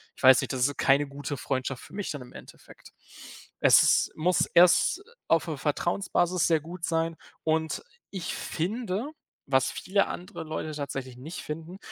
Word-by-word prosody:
ich - - -15
weiß 130 0 +8
nicht - - -4
das 125 -1 +2
ist 145 - -5
keine 140 +1 +4
gute 140 0 -5
Freundschaft 130 0 -3
für - - -15
mich 205 -1 -4
dann 145 -4 -5
im 125 - -15
Endeffekt. - - -14 0.7
Es - - +5
muss 175 +3 +2
erst 180 - +4 0.2
auf 165 +1 +3
'ner 155 -3 -3
Vertrauensbasis 175 +3 0
sehr 160 -3 +3
gut 170 +2 -10
sein. 165 0 0 0.3
Und 160 - 0 0.3
ich 185 -3 -4
finde, 215 - -3 0.4
was 130 -1 +2
viele 195 +1 0
andere 180 -2 -7
Leute 155 0 -4
tatsächlich 135 -3 -5
nicht 155 +7 -7
finden, 165 +4 -7
160 Hz, 160 wpm, -27 LUFS, 140-180 Hz, 0.7 s, weiß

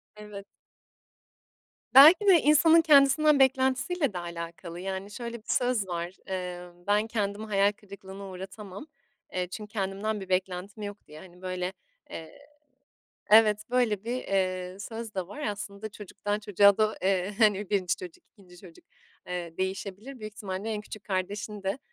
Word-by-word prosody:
Evet. 210 -1 -10 1.5
Belki 315 +10 +9
de 355 -5 +7
insanın 320 +3 +6
kendisinden 300 0 +5
beklentisiyle 265 - +2
de 180 - -3
alakalı. 170 0 -7
Yani, 190 +2 -5
şöyle 235 +2 -6
bir 220 - -21
söz 245 -6 +1
var. 175 0 -4
Eee, 180 -2 -4 0.3
ben 210 +2 +2
kendimi 210 -1 -2
hayal 200 -1 +3
kırıklığına 200 -1 -11
uğratamam, 195 +6 -9 0.5
eee, 180 -1 -1
çünkü 210 +2 -8
kendimden 200 +1 -2
bir 190 - -9
beklentim 185 +3 -2
yok 205 0 -8
diye, 150 +1 -12
hani, 180 0 -15
böyle, 185 0 -3 0.4
eee, 160 - -9 0.9
evet 210 -1 +6
böyle 235 -5 +1
bir, 235 +2 -3
eee, 185 -5 -2
söz 225 +1 -7
de 185 -2 -3
var 290 +10 -9
aslında 205 -1 -5
çocuktan 205 0 -4
çocuğa 200 -1 +4
da, 215 0 +2
eee, 190 +1 0
hani 210 -3 +3
1'nci 185 -3 +1
çocuk, 180 -2 -11
2'nci 180 -4 -18
çocuk, 175 -2 -15 0.4
eee, 175 -2 -5
değişebilir. 195 +7 -4
Büyük 215 -1 -7
ihtimalle 200 0 -5
en 210 -1 -3
küçük 210 0 -10
kardeşin 200 +2 -4
de, 195 +4 -1
200 Hz, 150 wpm, -28 LUFS, 185-220 Hz, 1.5 s, Belki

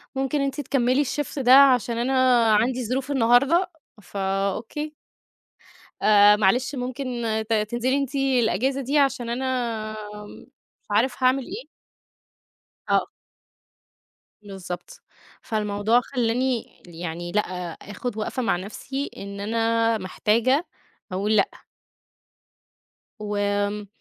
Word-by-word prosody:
ممكن 270 +2 0
أنتِ 275 +1 -2
تكملي 260 +1 +1
الshift 290 +1 -3
ده 250 0 +3
عشان 250 -4 +6
أنا 255 -1 +3
عندي 245 +3 +1
ظروف 260 +4 -2
النهارده، 275 +9 +3 0.3
فأوكي. 200 +10 -3 1.1
آآ، 205 -1 +6
معلش 245 +7 +1
ممكن، 255 +2 -4 0.4
ت - - +2
تنزلي 240 +5 0
أنتِ 280 0 -3
الأجازة 265 -1 +1
دي 280 +4 0
عشان 270 -4 +1
أنا 255 +3 -2 0.7
آمم، 210 0 -11 0.4
مش - - -43
عارف 245 +5 +1
هاعمل 260 +1 +3
إيه. 415 +7 -7 1.3
آه. - - +2 1.4
بالضبط. 185 -3 -8 0.4
فالموضوع 215 +1 +1
خلّاني 245 0 -1 0.2
يعني 175 0 -6
لأ، 210 - +2 0.4
آخد 210 +3 -6
وقفة 235 +4 -3
مع 195 -6 +2
نفسي 265 +8 -5
إن 200 0 -7
أنا 225 +1 +1
محتاجة 230 - +1 0.5
أقول 205 +4 0
لأ. 200 - +3 1.7
وآمم، 205 0 -1
235 Hz, 105 wpm, -24 LUFS, 210-265 Hz, 1.7 s, عشان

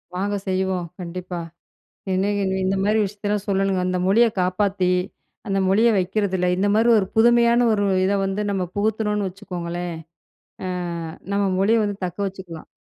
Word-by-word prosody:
வாங்க 200 +2 -1
செய்வோம், 185 -1 -1
கண்டிப்பா. 180 0 -5 0.7
என்ன 195 +2 +1 0.3
இந்த 195 +1 +1
மாதிரி 215 +1 +2
விஷயத்தலாம் 205 0 -3
சொல்லணுங்க. 195 -1 +1
அந்த 185 0 0
மொழிய 230 +4 +5
காப்பாத்தி 185 0 +1 0.6
அந்த 195 -1 0
மொழிய 215 +5 +4
வைக்கிறதில 190 -1 0
இந்த 200 +2 +1
மாதிரி 225 +2 +3
ஒரு 190 - 0
புதுமையான 235 +1 +5
ஒரு 205 -1 +1 0.2
இத 195 - +2
வந்து 195 +2 -2
நம்ம 195 -2 -1
புகுத்துனோன்னு 210 -1 0
வச்சுக்கோங்களேன், 175 -3 -5 0.7
ஆ - - -2 0.7
நம்ம 200 0 +1 0.2
மொழிய 220 +4 +3
வந்து 205 -1 -2
தக்க 180 +1 -6
வச்சுக்கலாம். 190 -4 -8
195 Hz, 140 wpm, -22 LUFS, 185-210 Hz, 0.7 s, மொழிய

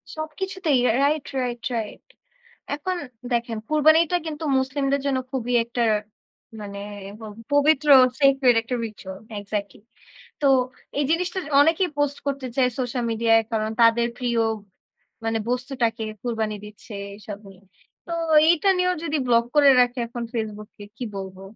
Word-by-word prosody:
সবকিছুতেই, 315 -1 -1
রাই 230 - +2
right, 295 0 +1 0.2
right, 240 -1 -3
right. 220 -2 -5 0.7
এখন 365 +5 -3 0.4
দেখেন 235 -1 -1
কুরবানিটা 315 +3 +4
কিন্তু 315 0 -5
মুসলিমদের 275 +1 0
জন্য 270 -2 +1
খুবই 245 -2 -2
একটা 235 +1 -2 0.8
মানে 200 -1 -7 0.4
ব - - -12 0.3
পবিত্র 295 +1 +3 0.3
sacred 270 -3 +5
একটা 240 +2 -4
ritual 190 -3 -9 0.2
এক্সাক্টলি। 205 0 -5 0.6
তো 290 - +2 0.5
এই 290 - +2
জিনিসটা 360 +3 0 0.2
অনেকেই 330 +4 +3
পোস্ট 290 -1 0
করতে 275 -2 -2
চায় 255 -2 +4
সোশ্যাল 245 -1 -2
মিডিয়ায় 225 0 +3
কারণ 215 0 0
তাদের 230 +1 +5
প্রিয় 240 -2 0 0.8
মানে 225 0 0
বস্তুটাকে 245 -2 -1 0.2
কুরবানি 220 -3 -2
দিচ্ছে 210 +2 -13 0.2
এসব 205 -1 -8
নিয়ে। 190 0 -18 0.4
তো 340 - -6 0.4
এইটা 345 +3 +3
নিয়েও 365 0 +2
যদি 315 -1 -1
ব্লক 235 -1 +4
করে 285 -1 +7
রাখে, 245 +1 +2
এখন 235 0 -6
Facebook 215 -2 -4
কে 205 - -9
কি 245 - -5
বলবো? 190 0 -8
250 Hz, 140 wpm, -24 LUFS, 225-295 Hz, 0.8 s, করে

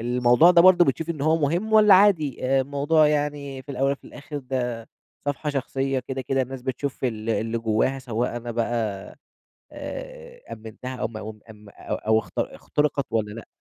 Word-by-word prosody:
الموضوع 125 +6 +4
ده 170 -1 +6
برضو 180 -1 +7
بتشوف 165 +3 -1
إن 155 -4 -5
هو 155 +3 +3
مهم 170 +9 -1
والّا 210 -2 +7
عادي، 170 -10 +3
آآ، 135 +1 +3
الموضوع 145 +3 +2
يعني 145 -2 -2
في - - -37
الأول 135 +2 0
في - - -28
الآخر 150 0 -8
ده 125 -4 -4 0.4
صفحة 145 +1 -2
شخصية، 135 -1 -2
كده 130 +1 -5
كده 135 +1 0
الناس 130 0 -7
بتشوف 130 +1 -4
ال 115 -2 -2
اللي 115 +1 -1
جواها، 115 +4 0
سواء 120 -2 -3
أنا 120 0 -5
بقى 115 0 -1 1.0
آآ، - - -8
أمّنتها 115 +4 -8
أو 110 - -2
م 115 - -10
أم 110 0 -8
أم 105 -1 -15
أو - - -6
أو 110 +1 +1
اخت 95 -5 -7
اختُرقت 145 -2 -1
والّا 110 -2 -1
لأ؟ 115 +1 -10
135 Hz, 180 wpm, -24 LUFS, 115-150 Hz, 1.0 s, برضو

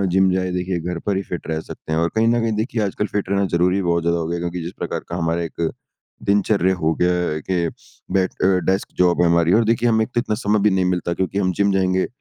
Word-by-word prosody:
Gym 95 -1 +4
जाए 95 0 0
देखिए 90 -1 -2
घर 85 0 -4
पर 100 -2 +1
ही 95 - -2
फिट 90 - -5
रह 80 -1 -1
सकते - - -8
हैं। 80 - +1
और 85 0 +1
कहीं 110 +1 +3
न 120 0 +3
कहीं 115 -1 0
देखिए 115 -2 -3
आजकल 100 +1 -2
फिट 100 -2 -1
रहना 100 0 +2
ज़रूरी 90 +3 +2
बहुत 85 -1 +1
ज़्यादा 85 0 +1
हो 80 - -2
गया 85 - -2
है 85 - -3
क्योंकि 85 0 -3
जिस 85 - -6
प्रकार - - -3
का 85 - -3
हमारा 85 0 0
एक 85 -1 -2 0.5
दिनचर्या 100 -2 +2
हो 80 -2 0
गया 90 -3 0
के 85 -2 +1 0.5
बैठ 95 -1 +2
अ, - - +5 0.2
डेस्क 95 - -1
जॉब 90 -1 +3
है 85 - +4
हमारी। 85 +1 +3
और 115 - +5
देखिए 115 +1 +2
हमें 110 -1 +3
एक - - -16
तो - - +4
इतना 110 -4 -2
समय 105 -2 +1
भी - - -2
नहीं 95 -1 +1
मिलता 90 -1 0
क्योंकि 95 +2 -2
हम 95 -2 +1
जिम 100 0 +3
जाएँगे 95 -1 +1
90 Hz, 265 wpm, -21 LUFS, 85-100 Hz, 0.5 s, अ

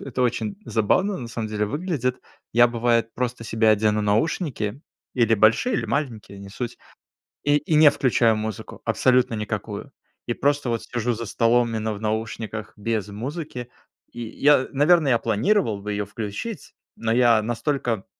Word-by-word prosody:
в - - -11
это 130 -2 -4
очень 190 - -1
забавно 185 - +1
на 120 -2 -6
самом 115 -1 -4
деле 105 0 -1
выглядит. 140 - -2 0.3
Я 120 +1 +6
бывает 115 -1 0
просто 125 -1 -3
себе 110 0 +1
одену 105 0 +3
наушники. 110 - -1 0.3
Или 115 -3 +3
большие, 110 - +3
или - - -1
маленькие, 115 -8 -3
не 100 - -10
суть. 120 +4 -5 0.7
И 145 0 +4
и 150 +2 -1
не 150 -1 +8
включаю 115 -4 +2
музыку, 110 -1 -6
абсолютно 125 -2 +2
никакую. 105 -1 -4 0.4
И 120 - -1
просто 145 -1 0
вот 115 -1 -1
сижу 120 0 -2
за 115 - -5
столом 115 +2 +2
именно 110 -1 -2
в 100 - -9
наушниках 110 0 -4
без 105 -1 -2
музыки. 125 +2 -6 0.4
И 120 - -8
я 140 +2 +3
наверно, 150 +2 +4
я 120 -3 +4
планировал 115 - +1
бы 105 - -4
ее 105 0 -2
включить, 110 - -6 0.2
но 115 -1 -1
я 120 -2 +4
настолько 120 -1 -2
115 Hz, 160 wpm, -23 LUFS, 110-130 Hz, 0.7 s, не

